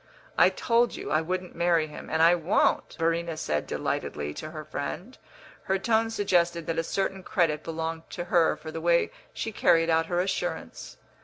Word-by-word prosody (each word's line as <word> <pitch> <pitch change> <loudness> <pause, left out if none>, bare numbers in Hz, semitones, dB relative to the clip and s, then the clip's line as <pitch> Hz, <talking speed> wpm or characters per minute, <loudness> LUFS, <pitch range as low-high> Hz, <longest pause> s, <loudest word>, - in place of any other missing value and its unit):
"I - - +6
told 235 +1 +1
you - - -6
I 155 - +3
wouldn't 180 +2 -3
marry 170 -2 +2
him, 150 -1 -10
and 160 0 +2
I 170 +1 +7
won't," 175 +2 +1
Verena 165 0 0
said, 75 - -2
delightedly, 75 0 -3
to 155 - -7
her 155 -1 -8
friend; 165 - -5 0.5
her 190 - +1
tone 225 +3 +1
suggested 175 -6 +1
that 165 +1 -1
a - - +1
certain 195 +2 -2
credit 165 -5 0
belonged 165 0 -4
to 175 - -5
her 175 -2 +3
for 160 +1 -9
the 160 - -5
way 170 0 +3 0.2
she 225 - -4
carried 165 -5 +3
out 165 0 +2
her 175 0 0
assurance. 190 +2 -3
170 Hz, 180 wpm, -27 LUFS, 160-185 Hz, 0.5 s, I